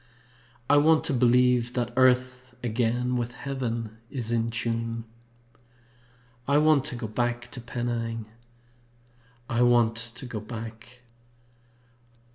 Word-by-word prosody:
I 145 - +5
want 155 +2 +5
to 145 - 0
believe 125 -1 +3
that 120 -1 -2
Earth 130 -1 +2
again 120 +2 0
With 120 0 -3
Heaven 120 -5 -4
is 120 -5 -4
in 115 0 +1
tune. 115 0 -2 1.4
I 140 +1 +4
want 150 -2 +4
to - - -2
go 120 - -5
back 120 +2 -2
to 130 -4 -6
Penang! 115 -1 -3 1.2
I 120 -2 0
want 120 -2 +4
to 115 +2 -2
go 115 -3 -5
back! 115 +2 -9
120 Hz, 115 wpm, -27 LUFS, 115-125 Hz, 1.4 s, I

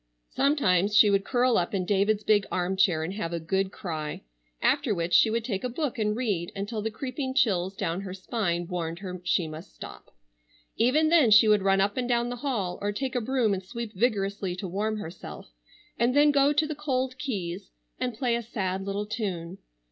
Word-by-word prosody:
Sometimes 210 - +2
she 210 -1 +7
would 195 0 +2
curl 250 0 +2
up 175 +3 -2
in 185 -2 -1
David's 205 +2 +1
big 205 -1 +3
arm 180 +1 -1
chair 175 -4 +2
and 170 +4 -4
have 185 -5 -4
a 170 - -1
good 190 +4 -1
cry, 155 - -5 0.4
after 210 - +2
which 170 0 -2
she 175 +6 +6
would 230 +1 -1
take 195 -6 -3
a 250 - -1
book 275 -1 -3
and 210 -1 +1
read 200 -9 -1
until 205 +2 -3
the 220 - -2
creeping 260 +3 -4
chills 190 -6 +2
down 185 -2 -2
her 195 -2 -6
spine 185 -4 -2
warned 170 -2 -3
her 185 -1 -7
she 175 -1 +1
must 155 +4 -10
stop. - - -10 0.7
Even 290 +7 +3
then 315 -8 +5
she 215 +1 +7
would 210 -1 +4
run 195 0 +3
up 200 +3 0
and 250 -1 -1
down 240 0 +1
the 245 - -4
hall 230 -9 -2
or 205 0 0
take 260 +5 -3
a 245 - 0
broom 235 -3 +1
and 190 - -2
sweep 225 +3 -6
vigorously 200 -3 -1
to 190 +1 -5
warm 210 +4 -2
herself 165 - -9 0.5
and 240 +3 +2
then 295 +1 +6
go 280 0 +4
to 295 +1 +2
the 310 - -3
cold 260 -3 -2
keys 195 -9 -4 0.3
and 250 -2 -2
play 245 -2 +1
a 235 - -2
sad 195 -4 -3
little 200 +1 -3
tune. 195 -5 -4
205 Hz, 210 wpm, -27 LUFS, 185-245 Hz, 0.7 s, she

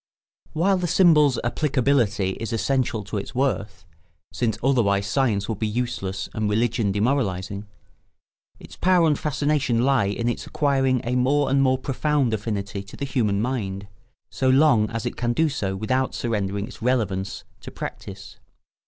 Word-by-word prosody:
] - - -76
While 190 +5 +2
the 180 -1 -1
symbol's 150 -7 +4
applicability 120 -6 +1
is 115 +1 -4
essential 125 -1 0
to 105 +1 -5
its 100 +5 -6
worth—since 95 - -3
otherwise 105 -7 +2
science 105 -2 0
would 110 -3 -3
be 110 - 0
useless 105 -4 -3
and 110 -1 -1
religion 110 -1 +1
demoralising—its 105 -3 -5
power 180 -2 +3
and 150 -3 +2
fascination 145 -5 0
lie 135 -5 +3
in 105 +4 -2
its 120 - -2
acquiring 135 -3 +1
a 120 +2 -1
more 135 +2 +2
and 135 0 +3
more 130 -1 +3
profound 135 -1 0
affinity 100 -2 -3
to 100 +2 -12
the 140 - -3
human 110 -7 0
mind, 100 -6 -3 0.4
so 130 - 0
long 130 -6 +4
as 115 -1 -4
it - - -4
can 120 0 0
do 160 +4 +2
so 100 -8 -3
without 130 +6 -1
surrendering 100 -3 -2
its 115 - -13
relevance 105 -6 -1 0.2
to - - -9
practice. 100 0 -8
120 Hz, 155 wpm, -23 LUFS, 100-135 Hz, 0.4 s, symbol's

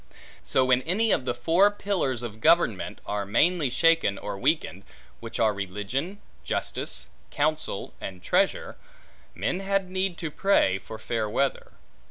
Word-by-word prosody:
So 130 - +2
when 130 0 +4
any 200 - +1
of 125 - +1
the 125 - 0
four 170 +11 +4
pillars 185 - -2
of 110 -2 -7
government, 160 - +2
are 105 0 -2
mainly 155 - +2
shaken, 165 -7 +3
or 105 - -5
weakened 125 - 0 0.4
(which 115 -1 -7
are 110 -2 +3
religion, 105 - -4 0.2
justice, - - -3 0.2
counsel, 155 -7 -2
and 90 -2 -7
treasure), - - +1 0.6
men 180 - -1
had 195 -1 -1
need 185 -1 -1
to 160 -3 -4
pray 145 - +2
for 110 - -9
fair 110 -1 -2
weather. 135 +5 -1
135 Hz, 145 wpm, -26 LUFS, 110-175 Hz, 0.6 s, when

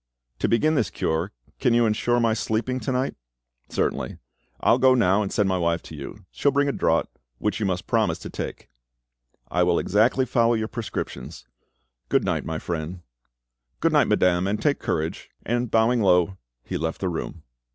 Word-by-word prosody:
"To - - +1
begin 155 +7 +3
this 115 - +1
cure, 80 +3 -1 0.3
can 120 - +3
you 120 0 +4
ensure 120 +2 +1
my 115 -1 +3
sleeping 115 +3 -1
to 130 - -3
night?" 130 +1 0 0.6
"Certainly. - - -1 0.4
I - - +3
will 120 - +4
go 130 0 +6
now, 100 -4 +3
and 100 - -3
send 105 - +2
my 95 -1 +1
wife 85 -1 0
to 80 - -10
you. 80 +8 -9
She - - -2
will 140 - +5
bring 140 +1 +2
a - - +2
draught, 80 -10 0 0.2
which 105 - -1
you 105 - 0
must 90 -1 -2
promise - - +1
to - - -8
take." - - -6 0.8
"I 90 - +2
will 90 -1 +3
exactly 115 +6 +2
follow 115 -1 +2
your 110 0 -2
prescriptions. 115 - -6 0.6
Goodnight, - - +1
my 80 0 -3
friend." 85 +2 -4 0.8
"Good - - +2
night, - - +4
madame; 90 0 +2
and 105 +2 -1
take 145 -2 +1
courage"; 80 +1 -3 0.2
and 120 +1 0
bowing 115 +2 +3
low, 90 -1 +3 0.2
he - - -4
left 80 +1 -2
the 95 - -1
room. 80 -1 -5
105 Hz, 185 wpm, -24 LUFS, 90-120 Hz, 0.8 s, go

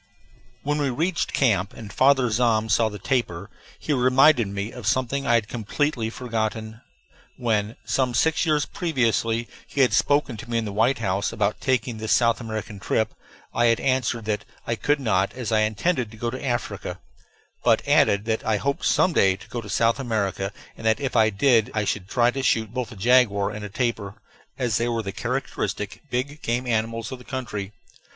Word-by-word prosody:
When 150 +1 0
we 140 - +1
reached 165 +6 -1
camp, 100 -7 +1
and 105 -3 -10
Father 135 -1 +4
Zahm 110 -1 +2
saw 110 -1 +3
the 105 - -7
tapir, 100 -4 -2 0.3
he 150 - -2
reminded 130 -1 +5
me 100 +3 -4
of 120 -5 -7
something 130 +4 0
I 120 - +4
had 110 -2 +1
completely 120 +2 -1
forgotten. 110 -2 -3 0.6
When, 110 -2 0
some 130 -2 0
six 160 +5 +2
years 150 -4 +2
previously, 115 - 0 0.2
he 140 - -1
had 130 - +4
spoken 145 -5 +2
to 115 - -10
me 115 - 0
in 115 - -1
the 105 - -5
White 115 +6 +2
House 100 -2 -1
about 105 -2 -1
taking 125 -3 0
this 110 0 0
South 115 0 +3
American 110 -2 -5
trip, 110 +2 0 0.4
I 120 - +2
had 115 -1 +3
answered 125 -4 0
that 105 -1 -1 0.2
I 115 - -1
could 145 +5 +1
not, 100 -7 +1
as 125 -4 -4
I 110 - +3
intended 110 - 0
to 110 - -13
go 120 +2 -2
to 130 - -6
Africa, 120 -3 -3 0.6
but - - +3
added 100 +1 +4
that 110 -1 -1
I 110 -1 +1
hoped 140 +5 -2
some 185 - +3
day 95 -8 +4
to 95 - -15
go 120 - -4
to 105 - -10
South 115 +5 +2
America 100 -6 -1 0.2
and - - -12
that 110 +3 +3
if 135 -3 -3
I 110 -2 +5
did 110 +1 +3
so - - -12
I 105 -1 0
should 100 -2 -2
try 120 +3 +3
to 135 - -3
shoot 110 -4 +1
both 125 -1 -3
a - - -9
jaguar 100 -2 +3
and 105 0 -7
a 105 - -5
tapir, 105 -2 -2 0.4
as 120 -5 0
they 115 - 0
were 115 -1 -1
the 100 - -4
characteristic 100 +1 -3
big 135 +5 -3
game 120 +2 -1
animals 115 +1 -1
of 130 - -6
the - - -13
country. 110 -7 -5
115 Hz, 200 wpm, -24 LUFS, 105-130 Hz, 0.6 s, reminded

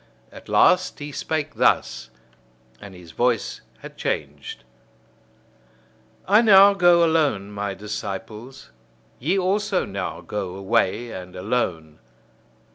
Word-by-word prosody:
At - - -14
last 180 0 +3
he 145 0 -7
spake 155 +1 -3
thus - - 0 0.7
and 100 -2 -11
his 90 -2 -13
voice 120 +3 -1 0.2
had - - -11
changed: 70 -1 -4 1.6
I 210 +3 +5
now 200 -3 +7
go 175 -3 +4
alone, 145 -12 0
my 100 -1 -4
disciples! 105 - -7 0.5
Ye 170 +9 0
also 195 +1 0
now 100 -2 -5
go 95 -3 -5
away, 100 +4 0
and 90 0 -9
alone! 90 -7 -3
115 Hz, 110 wpm, -22 LUFS, -, 1.6 s, now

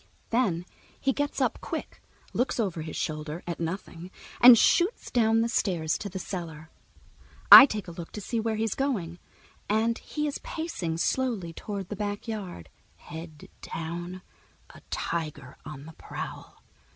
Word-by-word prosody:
Then 195 -8 +1 0.3
he 270 - +1
gets 290 +1 -2
up, - - +1
quick, - - -6 0.3
looks 250 0 0
over 185 -7 -1
his 155 - -6
shoulder 155 +2 -4
at 170 -1 -4
nothing, 170 0 -5 0.3
and 245 -1 +11
shoots 355 - +2
down 225 -1 +3
the 230 - +1
stairs 175 -9 0
to 205 - -5
the 190 - -6
cellar. 165 -4 -6 0.8
I 275 - +14
take 210 -6 -4
a - - -6
look 170 -1 -8
to - - -5
see 230 +3 -2
where 225 0 -1
he's 220 -1 0
going, 195 -12 -2 0.5
and 225 +3 +1
he 300 -1 -3
is 290 - -3
pacing 195 - -4
slowly 215 -4 -1
toward 200 0 -6
the 210 - -4
backyard, 205 - -5 0.3
head 160 -1 -10
down, 175 +3 -6 0.5
a - - -15
tiger 150 -5 -4
on 145 -1 -8
the 160 - -11
prowl. - - -8
185 Hz, 150 wpm, -28 LUFS, 165-225 Hz, 0.8 s, I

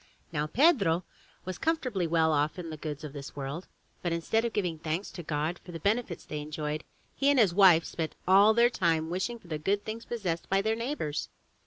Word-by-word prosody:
Now 150 -2 -1
Pedro 200 - +3 0.4
was 185 0 -5
comfortably 255 - 0
well 160 -1 +3
off 150 +3 +1
in 170 -3 -6
the - - -5
goods 150 0 -6
of 150 -2 -7
this 140 -2 -8
world> 140 +5 -5 0.3
but 175 - -1
instead 170 +7 +1
of 235 - -1
giving 175 -7 -1
thanks 165 +5 -3
to 175 - -7
God 155 +2 -2
for 180 - -10
the 165 - -6
benefits 200 0 -1
they 150 - -5
enjoyed, 150 0 -4 0.3
he 280 - +2
and 285 - +4
his 210 -8 +5
wife 180 -4 +6
spent 160 -2 -4
all 200 +4 +7
their 240 +1 +5
time 165 -7 +1
in 160 - -6
wishing 190 +7 -2
for 200 - -19
the 155 -2 -3
good 200 +6 0
things 225 +1 -5
possessed 185 -8 -3
by 195 - +3
their 220 +3 +1
neighbors. 230 - -3
175 Hz, 215 wpm, -29 LUFS, 155-215 Hz, 0.4 s, all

